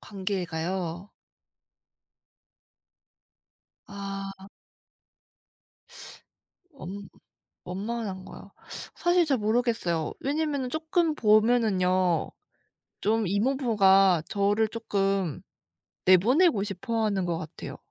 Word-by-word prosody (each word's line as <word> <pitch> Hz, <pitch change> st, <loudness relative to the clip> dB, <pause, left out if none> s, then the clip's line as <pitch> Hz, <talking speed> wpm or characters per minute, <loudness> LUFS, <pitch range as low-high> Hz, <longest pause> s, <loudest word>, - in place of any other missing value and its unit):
관계가요? 185 Hz, -2 st, -4 dB, 2.8 s
아. 195 Hz, -1 st, -6 dB
아. 190 Hz, -, -13 dB, 2.3 s
원 200 Hz, -, -8 dB, 0.6 s
원만한 195 Hz, 0 st, -4 dB
거요. -, -, -12 dB, 0.4 s
사실 350 Hz, 0 st, +3 dB
잘 275 Hz, -4 st, +1 dB
모르겠어요. 215 Hz, -7 st, 0 dB
왜냐하면은 285 Hz, -2 st, -1 dB
쪼끔 320 Hz, +1 st, 0 dB
보면은요. 210 Hz, -, +2 dB, 0.7 s
좀 220 Hz, 0 st, +1 dB
이모부가 200 Hz, -, +3 dB
저를 205 Hz, +2 st, +1 dB
쪼끔 195 Hz, -, -1 dB, 0.6 s
내보내고 225 Hz, -, +4 dB
싶어 220 Hz, +3 st, -2 dB
하는 200 Hz, -3 st, 0 dB
것 170 Hz, -2 st, -1 dB
같아요. 160 Hz, -, -8 dB
200 Hz, 175 characters per minute, -27 LUFS, 185-235 Hz, 2.8 s, 내보내고